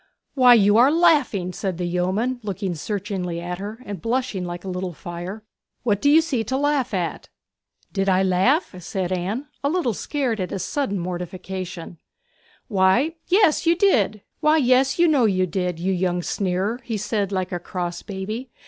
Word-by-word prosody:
'Why, 250 -3 +7
you 205 -1 +5
are 250 +4 +7
laughing!' 290 - +3
said 185 -1 -3
the 180 - -2
yeoman, 190 +8 -1
looking 195 -3 -3
searchingly 185 -1 -3
at 175 +1 -5
her 210 +3 -6
and 200 -5 -6
blushing 230 -6 -1
like 175 0 -6
a - - -8
little 180 -1 -3
fire. 175 +6 -7 0.4
'What 205 -4 +1
do 285 - +4
you 315 +3 +7
see 280 -8 -1
to 260 +5 -2
laugh 290 -3 +1
at?' 180 -5 -3 0.6
'Did 195 -1 +1
I 190 0 +3
laugh?' 195 - +2
said 185 +1 -3
Anne, 195 +10 -2 0.2
a 280 - +2
little 315 -8 0
scared 255 -3 -2
at 185 -1 -2
his 190 - -3
sudden 270 -9 -1
mortification. 180 -1 -6 0.7
'Why, 205 - +3
yes; 365 -4 +3
you 335 0 +4 1.3
know 285 -7 +4
you 185 -3 +2
did, 180 -1 -2
you 190 +3 0
young 180 -1 0
sneerer,' 195 +6 -1
he 230 -2 -3
said 205 -1 -1
like 185 -2 -2
a 175 - -2
cross 175 -1 -4
baby. 215 +6 -5
195 Hz, 165 wpm, -23 LUFS, 180-245 Hz, 1.3 s, Why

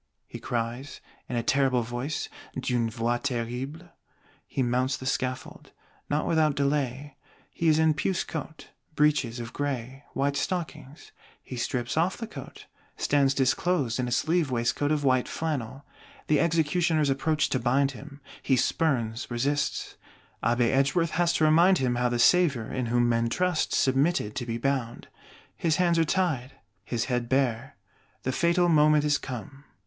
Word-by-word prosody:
he - - -9
cries 120 +4 -4 0.3
"in 125 - -3
a 120 - 0
terrible 130 -1 +2
voice 120 +6 -4 0.3
(d'une 120 -3 0
voix 115 +1 -1
terrible)." 130 +6 -4 0.6
He 135 - -1
mounts 125 +2 0
the 130 - -9
scaffold, 130 -1 -3 0.4
not 150 +1 0
without 155 -3 +2
delay; 140 -1 -1 0.3
he 165 - -2
is 155 -1 +5
in 160 0 +4
puce 170 +5 -1
coat, 160 0 -7 0.3
breeches 145 -5 +2
of 115 -1 -7
gray, 135 -1 -4
white 140 +1 0
stockings. 155 -5 -4 0.3
He 130 - -8
strips 120 +2 -2
off 175 +4 +1
the 230 - -5
coat; 150 - -10 0.3
stands 140 -2 +2
disclosed 135 -1 +1
in 125 - 0
a - - -4
sleeve 160 +5 +1
waistcoat 125 +4 0
of 150 -1 0
white 130 -2 +2
flannel. 140 -4 -4 0.4
The 150 - +2
Executioners 165 -2 +2
approach 150 +3 +1
to 130 - 0
bind 135 +3 +2
him: 140 +2 -12 0.2
he 135 - +2
spurns, 125 -5 0
resists; 140 +4 -1 0.5
Abbé 120 +1 +2
Edgeworth 150 +5 +2
has 175 0 +2
to - - +1
remind 170 +5 +5
him 130 -3 0
how 125 0 +1
the 120 - -1
Savior, 140 -3 +3
in 125 -2 -2
whom 120 +1 +2
men 115 0 +1
trust, 180 +3 0
submitted 135 -4 +1
to 120 - -3
be 115 0 -2
bound. 125 -2 -2 0.5
His 160 -2 +1
hands 175 -2 +2
are - - +5
tied, 155 -7 -1 0.3
his 115 +2 -2
head 120 -2 -2
bare; 130 -1 0 0.5
the 130 - -1
fatal 170 +5 +2
moment 150 -2 +4
is 145 -1 +2
come. 135 +3 -8
135 Hz, 155 wpm, -27 LUFS, 120-155 Hz, 0.6 s, is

